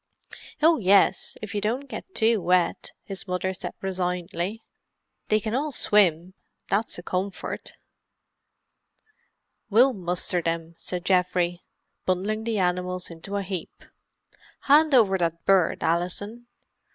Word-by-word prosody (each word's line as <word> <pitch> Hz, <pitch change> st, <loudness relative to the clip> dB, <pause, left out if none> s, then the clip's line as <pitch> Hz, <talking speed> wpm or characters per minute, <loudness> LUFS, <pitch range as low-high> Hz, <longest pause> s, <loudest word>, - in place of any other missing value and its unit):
"Oh, 320 Hz, -1 st, +5 dB
yes, 195 Hz, -1 st, +3 dB
if 210 Hz, -, -6 dB
you 205 Hz, -, -1 dB
don't 245 Hz, +7 st, -2 dB
get 375 Hz, +7 st, -9 dB
too 225 Hz, -2 st, +3 dB
wet," 180 Hz, 0 st, +1 dB
his 195 Hz, 0 st, -6 dB
mother 180 Hz, +1 st, -1 dB
said -, -, -7 dB
resignedly. 180 Hz, +2 st, -3 dB, 0.6 s
"They 215 Hz, -, +3 dB
can 215 Hz, +1 st, -4 dB
all 290 Hz, +4 st, -1 dB
swim, 185 Hz, -, +2 dB, 0.4 s
that's 210 Hz, +3 st, 0 dB
a 175 Hz, -, -8 dB
comfort. 185 Hz, +2 st, -4 dB, 2.0 s
"We'll 245 Hz, +5 st, +5 dB
muster 180 Hz, -2 st, 0 dB
them," 165 Hz, 0 st, -3 dB
said 180 Hz, -1 st, -4 dB
Geoffrey, 180 Hz, -1 st, +1 dB, 0.5 s
bundling 205 Hz, +4 st, -1 dB
the 230 Hz, -2 st, -1 dB
animals 180 Hz, -1 st, -1 dB
into 180 Hz, +5 st, -5 dB
a 200 Hz, -, -2 dB
heap. 185 Hz, -3 st, -6 dB, 0.8 s
"Hand 300 Hz, 0 st, +5 dB
over 195 Hz, -6 st, +4 dB
that 170 Hz, -1 st, -2 dB
bird, 190 Hz, -4 st, +3 dB
Alison. 205 Hz, +8 st, -2 dB
190 Hz, 125 wpm, -25 LUFS, 180-215 Hz, 2.0 s, Oh